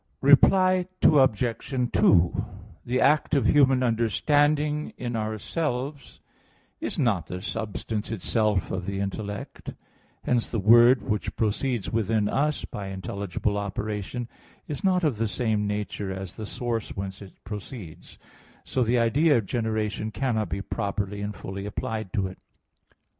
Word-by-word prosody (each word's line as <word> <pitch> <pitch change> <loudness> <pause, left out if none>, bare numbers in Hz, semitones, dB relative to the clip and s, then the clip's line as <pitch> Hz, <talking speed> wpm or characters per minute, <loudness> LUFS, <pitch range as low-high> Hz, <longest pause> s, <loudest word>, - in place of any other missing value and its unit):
Reply 185 +6 +5 0.2
Obj. 125 -1 +3
2: 85 -2 +4 0.4
The 125 +2 +1
act 150 +2 +3
of 140 - +2
human 135 -3 +4
understanding 145 +6 +1
in 120 -1 -3
ourselves 125 +6 -3 0.6
is - - -4
not 100 - +1
the 90 +1 -5
substance 110 +1 -4
itself 110 -2 0
of 95 0 -3
the 100 0 -2
intellect; 100 +1 -5 0.5
hence 120 -2 +1
the 115 - -2
word 120 +3 +6
which 105 - -2
proceeds 115 0 -1
within 110 -1 +1
us 150 +6 0
by 100 -1 -6
intelligible 100 +1 -3
operation 105 +3 -4 0.4
is 145 - -5
not 185 -2 +2
of 145 -8 +1
the 115 +1 0
same 105 -2 0
nature 105 -1 -3
as 95 -1 -6
the 110 -2 -6
source 115 -2 -3
whence 95 0 -5
it 95 -2 -11
proceeds; 105 - -9 0.5
so 130 - 0
the 120 +2 +2
idea 140 +6 +4
of 110 - -1
generation 110 -1 -2
cannot 110 -4 -1
be 95 +4 -3
properly 100 +1 -3
and 105 0 -4
fully 95 +1 -6
applied 110 0 -4
to 100 -5 0
it. 95 0 -7
110 Hz, 135 wpm, -26 LUFS, 100-130 Hz, 0.6 s, word